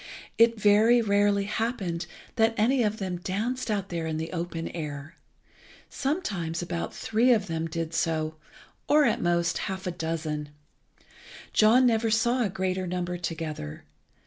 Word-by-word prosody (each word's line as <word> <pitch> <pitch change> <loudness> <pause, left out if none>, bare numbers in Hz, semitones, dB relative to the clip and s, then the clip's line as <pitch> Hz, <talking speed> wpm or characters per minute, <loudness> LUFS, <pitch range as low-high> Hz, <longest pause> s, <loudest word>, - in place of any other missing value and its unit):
It 230 -1 +5
very 215 +4 +5
rarely 205 -2 +2
happened 195 -6 -2 0.3
that 225 0 +3
any 245 +5 +3
of 215 -1 0
them 185 -3 -3
danced 225 +8 -3
out 200 -2 -1
there 165 -2 -3
in 160 -1 -2
the 160 +1 -4
open 165 -1 -4
air. 150 -2 -6 0.8
Sometimes 200 - -2
about 170 -1 -3
three 225 +3 +2
of 215 -5 +3
them 165 -2 -2
did 165 0 -4
so, 155 -1 0 0.6
or, 300 0 +6
at - - +2
the - - -4
most, 170 -1 +1
half 190 -1 -5
a 180 - -1
dozen. 160 -3 -3 1.0
John 230 +4 +5
never 225 -1 +2
saw 235 +3 +2
a 220 - +1
greater 185 0 -2
number 180 0 -3
together. 155 - -5
185 Hz, 150 wpm, -27 LUFS, 165-225 Hz, 1.0 s, or